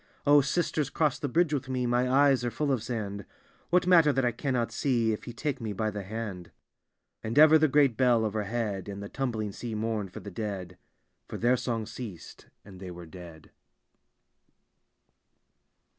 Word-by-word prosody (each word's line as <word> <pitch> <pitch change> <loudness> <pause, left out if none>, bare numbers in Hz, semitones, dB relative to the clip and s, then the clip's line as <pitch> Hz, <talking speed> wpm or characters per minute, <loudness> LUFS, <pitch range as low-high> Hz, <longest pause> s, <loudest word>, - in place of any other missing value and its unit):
O, 145 0 +6
sisters, 150 0 -1
cross 150 -4 0
the 145 - -3
bridge 165 +2 +2
with 135 -2 -2
me, 130 -1 -1
My 125 +1 +1
eyes 135 -1 +4
are 120 - 0
full 140 +5 -1
of 130 -5 0
sand. 105 -4 -4 0.5
What 180 0 +3
matter 170 -5 +6
that 135 -2 0
I 120 - +2
cannot 120 -1 -2
see. 115 -2 +1
If 105 - -7
ye 120 - -6
take 145 +2 -3
me 110 -2 -3
by 110 +2 -1
the 105 0 -5
hand? 100 -3 -6 0.4
" - - -54
And 110 +4 -3
ever 155 +1 +8
the 155 - +4
great 140 -5 +3
bell 120 -3 +3
overhead. 105 -1 -3
And 100 0 -6
the 100 - -7
tumbling 115 -6 -3
sea 115 +2 -6
mourned 110 -3 -2
for - - -8
the - - -9
dead; 95 -5 -5 0.5
For - - -6
their 120 +2 +3
song 115 -3 -2
ceased, 105 -6 -9 0.2
and 95 -2 -12
they 95 -1 -7
were 90 -1 -9
dead. 85 -1 -12
115 Hz, 185 wpm, -28 LUFS, 105-135 Hz, 0.5 s, ever